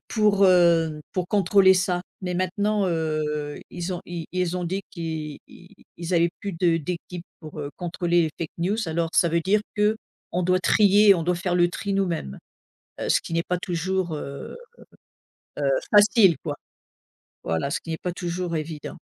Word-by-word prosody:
pour, 210 -3 +3
heu, 170 -4 +4
pour 180 -2 -2
contrôler 200 -1 +5
ça, 180 -1 0 0.2
mais 180 -1 -2
maintenant, 200 +3 0
heu, 155 -3 -2
ils 175 +1 -4
ont 175 - -5
ils 170 -2 -6
ils 180 -1 -1
ont 180 - -3
dit 190 +3 -2
qu'ils 160 -3 -5 0.6
ils 170 +1 -5
avaient 170 0 +4
plus 200 - -3
de 170 -1 +2
d'équipes 175 +2 -5 0.2
pour, 155 -1 -10
heu, 145 -1 -5
contrôler 175 -1 +1
les 160 - -2
fake 165 - -4
news 185 +5 0
Alors 165 +1 -1
ça 170 - +4
veut 170 +1 +2
dire 195 +5 +2 0.2
qu'on 210 -4 -2
doit 185 +1 +2
trier 205 +1 +5
on 170 - -1
doit 180 +2 +1
faire 175 +1 -2
le 175 0 +4
tri 200 +2 -3
nous-mêmes. 170 - -1 0.6
Heu, - - -2
ce - - +4
qui - - -9
n'est 165 0 +1
pas 180 - 0
toujours, 180 0 -2
heu 140 - -7 1.0
heu, - - +1 0.2
facile 205 -3 +6
quoi, 145 -3 -4 0.9
voilà 80 +12 -1
ce - - -1
qui 165 - -6
est 160 - -3
pas 180 - -1
toujours 175 -1 -3
évident. 155 -1 -6
175 Hz, 175 wpm, -24 LUFS, 165-190 Hz, 1.0 s, facile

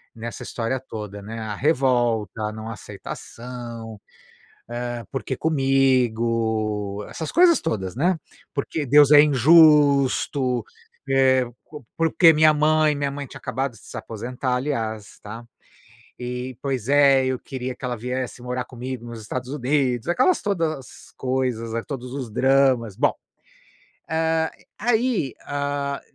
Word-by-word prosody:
nessa 115 +1 -7
história 120 +2 -3
toda, 105 -5 -8
né, 110 +3 -7
a 110 -1 -4
revolta, 120 - +1
a 105 - -1
não 110 +1 -7
aceitação, 115 +1 -8 0.7
eh, 120 0 -4
porque 135 -1 -3
comigo, 115 -8 +1
essas 160 - -5
coisas 345 -1 +5
todas, 95 - -3
né, 170 +7 +1 0.4
porque 145 +1 -2
Deus 145 +2 +6
é 145 - +10
injusto, 140 -3 +4 0.5
eh, 130 -1 +4 0.2
co 150 -5 -12
por 165 -1 +2
que 165 -3 +7
minha 155 0 +5
mãe? 155 0 +3
Minha 140 -1 -1
mãe 140 0 -5
tinha - - -11
acabado 135 +2 -3
de 115 - -16
se - - -11
aposentar, 125 +3 -4
aliás, 115 -6 -2
está? 115 +3 -10 0.7
E, 125 0 -5
pois 130 -4 -3
é, 140 -2 +5
eu 130 -1 -1
queria 130 -1 -5
que - - -24
ela 125 -1 -2
viesse 125 +1 -4
morar 125 0 -3
comigo 125 -1 -7
nos 115 -1 -8
Estados 125 +4 -5
Unidos, 130 -3 0
aquelas 255 - +2
todas 165 - -3
coisas 125 -3 -2
as 115 - -2
todos 125 -3 -6
os 135 -3 -5
dramas. 130 -3 +2
Bom, - - +2 1.0
eh, 160 0 +1 0.3
aí, 225 - +1
hã, 140 -1 -2
130 Hz, 135 wpm, -23 LUFS, 115-145 Hz, 1.0 s, é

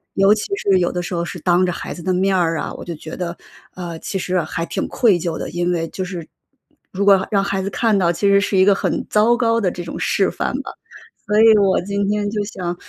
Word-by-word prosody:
尤 195 +2 +5
其 215 - -2
是 195 - +2
有 175 - +1
的 180 - -3
时 180 +1 -6
候 170 0 -1
是 175 0 -6
当 180 +2 +2
着 180 - -1
孩 - - -6
子 170 - -10
的 185 - 0
面 190 +1 +1
儿 165 -3 +1
啊， - - -4
我 - - -9
就 170 - -5
觉 155 +1 -9
得， 175 -1 -5 0.4
呃， 175 -2 -6
其 190 - -4
实 180 0 0
还 165 +1 -4
挺 - - -3
愧 215 -8 +3
疚 165 -1 -3
的， - - -5
因 175 +1 -1
为 165 -1 -1
就 185 - -5
是 180 -3 -6 0.6
如 200 +2 -2
果 195 -1 +5
让 200 -1 +3
孩 195 -1 -1
子 195 - -3
看 220 -1 +1
到， 170 -2 +2
其 200 +4 0
实 200 0 +5
是 200 -1 0
一 190 - +5
个 200 -1 +5
很 - - -2
糟 225 +3 +3
糕 230 -1 +1
的 180 -3 +1
这 175 - -7
种 - - -6
示 - - +1
范 - - -3
吧。 - - -8 0.6
所 210 +1 +3
以 220 -1 +7
我 195 -2 +3
今 200 +1 -2
天 205 0 -1
就 210 -1 -2
想 175 -4 -5
190 Hz, 280 characters per minute, -19 LUFS, 175-200 Hz, 0.6 s, 以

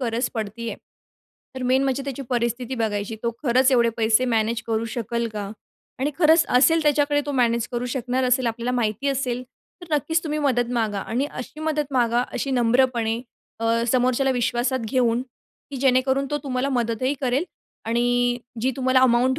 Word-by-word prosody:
गरज 240 0 -1
पडती 225 +1 -4
आहे, - - -6 0.8
तर 260 - -5
मेन 255 +2 +2
म्हणजे 270 0 0
त्याची 275 -1 -5
परिस्थिती 240 +1 -1
बघायची. 220 -2 -2
तो 235 - 0
खरंच 260 0 +3
एवढे 235 -2 +4
पैसे 225 +2 +3
मॅनेज 225 -1 0
करू 225 0 0
शकेल 235 0 -2
का 205 -2 -5 0.5
आणि 280 +3 +1
खरंच 320 0 +5
असेल 325 +5 +4
त्याच्याकडे, 290 -1 +2
तो 290 - -2
मॅनेज 235 -3 +1
करू 240 0 -2
शकणार 255 +1 -1
असेल, 250 0 +2
आपल्याला 235 +1 -2
माहिती 225 +3 -1
असेल 255 -2 -1 0.4
तर 330 -3 -2
नक्कीच 320 +3 0
तुम्ही 305 -1 -2
मदत 245 -5 +1
मागा 220 -4 0
आणि 245 +8 -2
अशी 250 +5 -8
मदत 300 -2 -2
मागा, 240 -1 +2
अशी 275 - -2
नम्रपणे 240 -2 +2 0.4
अ, 230 0 +1
समोरच्याला 255 +1 +2
विश्वासात 245 +1 0
घेऊन, 245 -2 +2 0.5
की 280 - -5
जेणेकरून 265 +1 +2
तो 295 - 0
तुम्हाला 265 0 -1
मदतही 245 +1 0
करेल 260 +3 +1 0.4
आणि 245 +1 +1 0.2
जी 255 +3 +1
तुम्हाला 260 -1 +3
अमाउंट 255 +1 +3
250 Hz, 165 wpm, -23 LUFS, 235-265 Hz, 0.8 s, खरंच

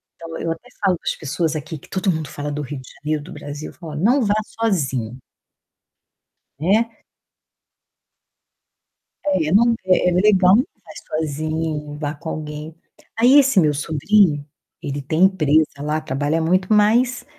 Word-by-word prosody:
Então 165 -1 -8
eu 165 - -2
até 165 +10 -7 0.2
falo 185 -3 +3
para - - -13
as - - -2
pessoas 160 +2 -2
aqui, 155 +1 -5
que - - -18
todo 190 0 0
mundo 155 -4 -4
fala 145 +1 -5
do 150 +1 -3
Rio 145 0 -6
de - - -14
Janeiro, 150 0 -2
do - - -10
Brasil, 145 +1 -7
eu - - -20
falo: 165 -3 -9
"Ó, - - -6
não 235 - +3
vá 205 +1 +2 0.2
sozinho" 135 - -1 1.4
né. 220 +8 +1 2.3
É, 185 -6 +1
não 235 +5 +5
é 185 -1 +3
é - - 0
legal, 185 0 +5
mas 255 - +3
não 215 - -41
vai 160 -1 -6
sozinho, 155 -1 -3
vá 150 -1 -3
com 160 +2 -8
alguém. 155 +1 -6 0.4
Aí 250 +5 +7
esse 270 -6 +4
meu 155 -4 +3
sobrinho, 155 +1 +2 0.4
ele 140 0 -4
tem 155 +6 +1
empresa 160 -5 +4 0.2
lá, 150 +1 -1
trabalha 145 +5 -1
muito, 180 +3 +1
mas 235 +4 +3
160 Hz, 165 wpm, -21 LUFS, 150-195 Hz, 2.3 s, Aí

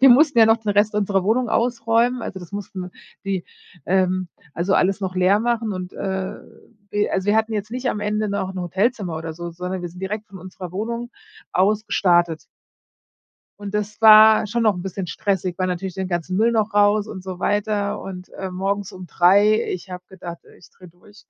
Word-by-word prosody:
Wir 270 - +8
mussten 280 +2 +5
ja 225 -1 +7
noch 225 0 +5
den 220 -2 -3
Rest 205 +1 +2
unserer 200 -2 +1
Wohnung 230 +5 +1
ausräumen. 235 +1 +1
Also 190 -3 -6
das 175 - -11
mussten 190 -2 -6 0.3
die 190 -3 -2 0.4
ähm, 185 0 +1 0.3
also 175 +5 0
alles 195 +2 +2
noch 185 -2 -3
leer 185 +2 +3
machen 230 -1 -1
und, 185 -1 -6
äh, 190 -1 -3 0.6
wir 205 0 0
also 190 0 -1
wir 205 +1 +3
hatten 220 0 +1
jetzt 210 0 -3
nicht 250 +2 -3
am 210 - -2
Ende 210 +1 -1
noch 200 -2 -2
'n 190 - -5
Hotelzimmer 190 0 -1
oder 160 0 -5
so, 170 +2 -7
sondern 180 +2 -5
wir 175 - -5
sind 180 +2 -13
direkt 210 +3 -4
von 195 - -12
unserer 185 -1 -9
Wohnung 235 +4 -4 0.4
aus 210 +4 +2
gestartet. 175 -3 +2 1.1
Und 205 -1 -7
das 210 0 -3
war 215 0 +8
schon 235 +3 -1
noch 215 -3 +3
'n 175 - -6
bisschen 190 -1 -5
stressig, 185 +1 -2
weil 185 - 0
natürlich 185 0 -3
den 190 -1 -3
ganzen 180 +1 -2
Müll 225 +3 +3
noch 215 -2 0
raus 205 +1 +4
und 190 -3 -8
so 185 -1 -7
weiter 205 0 0
und, 180 -1 -8
äh, 190 -1 -5
morgens 195 +2 -2
um 185 -2 -10
3. 200 +6 +4
Ich 180 +1 -7
habe 180 0 -7
gedacht, 175 -3 -9 0.2
ich - - -18
drehe 185 - -16
durch. 205 +5 -20
195 Hz, 205 wpm, -22 LUFS, 185-215 Hz, 1.1 s, Wir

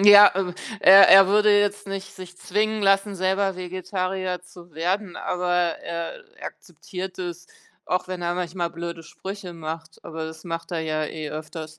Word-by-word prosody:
Ja, 205 0 +10
äh, 185 -2 -2 0.3
er 195 0 +9
er 195 0 +9
würde 210 0 +5
jetzt 205 -1 -1
nicht 195 -1 -6
sich 180 -1 -11
zwingen 215 +3 -1
lassen 195 0 +2
selber 190 +1 0
Vegetarier 185 0 -3
zu 175 -1 -16
werden 180 +4 -2
aber 180 0 -2 0.3
er 170 -1 -6 0.2
akzeptiert 185 0 -8
es 175 -1 -6 0.4
auch 180 - -1
wenn 185 -1 -5
er 175 0 -1
manchmal 175 -1 -3
blöde 170 0 -6
Sprüche 190 +2 -8
macht, 160 0 -7
aber 160 -1 -6
das 160 0 -10
macht 165 0 -5
er 165 - -1
ja 155 -1 -2
eh 155 0 -6
öfters. 155 0 -8
180 Hz, 165 wpm, -24 LUFS, 170-195 Hz, 0.4 s, Ja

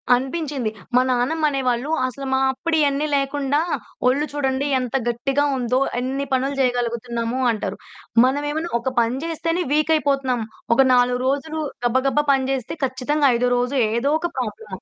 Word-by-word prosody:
అనిపించింది. 270 -2 -2 0.3
మా 250 - +6
నానమ్మ 260 +6 +1
అనేవాళ్ళు 260 0 -1 0.2
"అసలు 270 +2 -5
మా 265 - +3
అప్పుడు 325 +5 -2
ఇయన్నీ 290 +1 +1
లేకుండా 275 +1 0 0.5
ఒళ్ళు 280 +4 +2
చూడండి 275 0 0
ఎంత 250 +1 -4
గట్టిగా 270 +4 0
ఉందో, 250 +1 +1 0.2
ఎన్ని 270 +2 -2
పనులు 270 +2 0
చేయగలుగుతున్నాము" 240 0 -1
అంటారు. 215 - -4 0.5
మనం 275 +3 +1
ఏమన్నా 320 +3 -3
ఒక 255 +2 -3
పని 230 +2 0
చేస్తేనే 330 +2 -1
వీకైపోతున్నాం. 280 -5 +1 0.3
ఒక 270 - +5
4 245 0 +3
రోజులు 310 +3 -1 0.3
గబగబా 265 +4 +2
పని 265 -1 +1
చేస్తే, 260 -3 -3
ఖచ్చితంగా 275 +3 0
ఐదో 250 +1 +1
రోజు 250 +3 -1 0.2
ఏదో 265 +5 +1
ఒక 345 - -1
ప్రాబ్లమ్. 215 -5 -5
265 Hz, 145 wpm, -22 LUFS, 245-290 Hz, 0.5 s, మా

